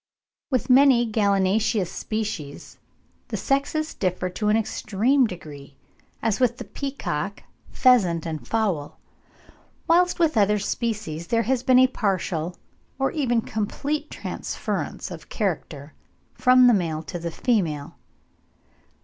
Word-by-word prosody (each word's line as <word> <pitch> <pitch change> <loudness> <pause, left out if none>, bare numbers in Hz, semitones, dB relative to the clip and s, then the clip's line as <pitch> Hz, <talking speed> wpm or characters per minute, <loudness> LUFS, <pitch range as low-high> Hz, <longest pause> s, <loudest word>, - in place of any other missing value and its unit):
With 255 -5 0
many 255 -2 +6
gallinaceous 200 -2 +1
species 210 -10 -5 0.5
the - - -4
sexes 295 +3 -1
differ 185 -1 -1
to 210 +3 -1
an 215 - +4
extreme 225 +4 +1
degree, 145 -7 -10 0.5
as 220 -2 +1
with 245 -2 +2
the - - -6
peacock, 200 - -4 0.3
pheasant, 185 -11 +3
and 160 -2 -5
fowl, 190 -10 -1 0.9
whilst 355 +2 +3
with 325 -7 +2
other 210 0 +4
species 205 -6 -3
there 230 -1 +1
has 255 0 0
been 255 0 +4
a 260 - +7
partial 185 -8 -1 0.4
or 270 0 0
even 245 -7 +1
complete 285 +9 -3
transference - - -4
of - - -9
character 155 - -3 0.4
from 255 0 +5
the 245 - +7
male 165 -5 -1
to 170 +3 -6
the 170 0 -4
female. 165 - -1
215 Hz, 125 wpm, -24 LUFS, 175-255 Hz, 0.9 s, a